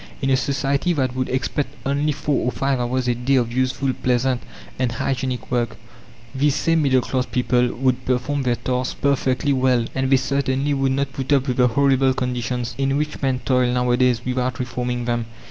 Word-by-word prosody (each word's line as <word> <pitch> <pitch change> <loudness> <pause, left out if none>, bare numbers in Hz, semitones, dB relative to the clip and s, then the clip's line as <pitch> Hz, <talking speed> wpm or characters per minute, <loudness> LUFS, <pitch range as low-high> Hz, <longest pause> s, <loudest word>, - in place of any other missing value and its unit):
In 135 -1 0
a - - +5
society 140 +5 0
that 130 -5 -1
would 130 0 -1
expect 135 +2 -2
only 145 +2 +1
four 145 0 -1
or - - +1
five 135 0 0
hours 125 +1 -1
a 120 - +3
day 125 +3 0
of 120 -3 +1
useful, 130 +1 0
pleasant, 125 0 0 0.4
and 125 -2 0
hygienic 130 -2 -2
work, 120 -2 -1 0.6
these 140 +1 +2
same 165 -1 +2
middle 130 -3 +3
class 130 +1 -2
people 125 0 +1
would 130 0 0
perform 130 +3 0
their 125 -2 +1
task 125 +1 -3
perfectly 140 0 +1
well, 130 -3 +2
and 130 0 -1
they 135 - +5
certainly 135 +1 0
would 135 -1 +1
not 140 0 -1
put 135 -1 -4
up 140 -1 +3
with 125 - -1
the 125 -1 +5
horrible 135 +1 +3
conditions 125 -1 -2
in 135 0 +1
which 150 0 -3
men 130 -2 0
toil 125 -2 +2
nowadays 125 -1 +2
without 125 -1 -1
reforming 125 0 -3
them. 120 -1 -1
130 Hz, 190 wpm, -22 LUFS, 125-135 Hz, 0.6 s, a